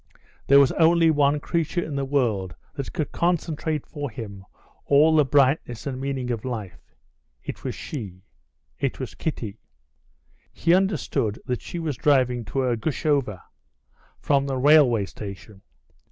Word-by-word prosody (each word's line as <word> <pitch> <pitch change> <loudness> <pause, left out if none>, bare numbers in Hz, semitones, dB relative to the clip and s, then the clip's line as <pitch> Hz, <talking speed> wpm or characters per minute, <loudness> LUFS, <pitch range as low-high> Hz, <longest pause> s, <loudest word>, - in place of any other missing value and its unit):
There 140 +1 +7
was 140 -2 +5
only 165 0 +4
one 145 -1 +2
creature 170 +2 -1
in 150 - -5
the 140 0 -1
world 110 - 0 0.2
that 140 -2 -5
could 155 -5 -3
concentrate 160 -3 -1
for 145 -2 -5
him 100 -4 -8 0.4
all 150 +3 +5
the 150 - +6
brightness 135 -3 +1
and 130 -2 -4
meaning 135 -2 -2
of 115 -3 -3
life. 110 -8 -7 0.5
It - - -7
was - - -3
she. 95 - -7 0.6
It - - -2
was - - -5
Kitty. 115 -9 -4 0.9
He 170 - +2
understood 175 - 0
that 125 -2 -2
she - - -7
was 160 -5 -3
driving 125 -5 +2
to 130 +6 -1
Ergushovo 130 - 0 0.8
from 140 -1 +1
the 135 -1 -2
railway 130 -6 +5
station. 100 0 -10
140 Hz, 140 wpm, -24 LUFS, 115-155 Hz, 0.9 s, There